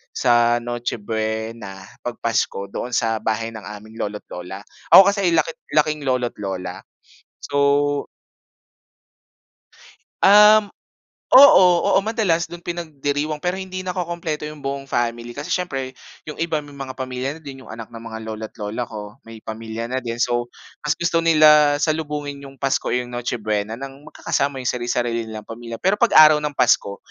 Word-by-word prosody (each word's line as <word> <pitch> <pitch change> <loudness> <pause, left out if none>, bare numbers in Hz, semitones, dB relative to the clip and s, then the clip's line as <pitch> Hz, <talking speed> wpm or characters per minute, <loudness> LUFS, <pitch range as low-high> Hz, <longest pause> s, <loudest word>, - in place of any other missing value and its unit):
sa 120 -1 +3
Noche 120 0 -3
Buena, 110 -2 -4 0.2
'pag 120 - -4
Pasko 105 -3 -1
doon 125 - -5
sa 115 -1 +1
bahay 110 +1 -2
ng 110 -2 -9
aming 110 +2 -10
lolo't 105 0 -4
lola. 90 +3 -7 0.3
Ako 195 - +11
kasi 200 -3 0
laki 165 0 +2 0.2
laking 150 -1 +2
lolo't 125 -2 0
lola 95 -2 -5 0.6
so 145 0 +1 2.2
Um 210 +1 +7 0.7
oo, 260 -8 +9 0.3
oo, - - +5
madalas 200 -7 0
dun 175 0 -9
pinagdiriwang 150 -3 -3
pero 180 +1 -1
hindi 185 0 -6
nakokumpleto 170 -4 -3
yung 150 -2 -11
buong 135 0 -4
family 120 0 -2
kasi 145 +5 -6
siyempre 135 -8 -3 0.4
yung 150 - -6
iba 165 -2 0
may 145 - -13
mga 130 -1 -7
pamilya 130 0 -3
na - - -18
din. 135 -2 -9
Yung - - -15
anak 115 0 -8
ng 115 - -9
mga 110 -1 -7
lolo't 110 0 -7
lola 105 +3 -3
ko 105 +2 -9
may 115 0 -10
pamilya 110 +1 -5
na 130 - 0
din. 115 -1 -5
So, 120 0 0 0.4
mas 150 - +1
gusto 170 -1 +1
nila 150 -2 +6
salubungin 150 -3 -2
yung 135 - -18
pasko 135 -1 0
o - - +2
yung 125 0 -3
Noche 120 0 -3
Buena 105 +1 -2
nang 135 +1 -9
magkakasama 140 -1 -1
yung 125 - -1
sari-sarili 120 -1 -2
nilang 110 -1 -8
pamilya. 115 0 -7
Pero 190 +2 +2
pag-araw 155 -9 +7
ng 150 -2 -3
Pasko 100 -4 +2
130 Hz, 160 wpm, -21 LUFS, 115-155 Hz, 2.2 s, Ako